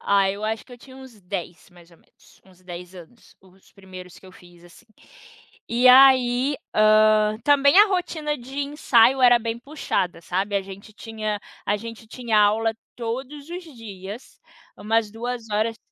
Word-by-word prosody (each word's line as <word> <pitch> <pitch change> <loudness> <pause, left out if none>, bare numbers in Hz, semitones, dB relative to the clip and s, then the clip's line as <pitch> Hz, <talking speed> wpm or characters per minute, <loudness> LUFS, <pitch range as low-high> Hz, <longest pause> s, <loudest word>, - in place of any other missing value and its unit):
Ah, 200 -1 +2
eu 200 +2 -6
acho 220 0 -3
que 255 - -17
eu 245 - -12
tinha 260 +2 -15
uns 260 -5 -14
10 180 -2 -7
mais 175 -1 -19
ou - - -19
menos, - - -26
uns 185 -1 -22
10 180 0 -10
anos, 185 +7 -16
os 190 0 -24
primeiros 185 -2 -13
que - - -18
eu 185 - -15
fiz, 175 -1 -19
assim. 175 +7 -19 0.8
E 240 +2 +1
aí, 260 +1 +5 0.2
hã, 215 0 +4
também 285 +4 +4
a 420 - +8
rotina 320 -5 -2
de 265 +3 -9
ensaio 270 -3 +2
era 245 -1 +6
bem 230 0 -4
puxada, 240 - -3
sabe, 195 +4 -2
a - - +1
gente 195 +2 -12
tinha 215 -1 -5 0.3
a 205 - +1
gente 230 +1 -10
tinha 235 -1 -2
aula 220 +2 +2 0.2
todos 265 +6 -6
os 355 +1 -6
dias, 205 +1 -10 0.4
umas 220 +1 0
2 235 +1 -6
horas 220 +2 -1
225 Hz, 170 wpm, -23 LUFS, 195-250 Hz, 0.8 s, a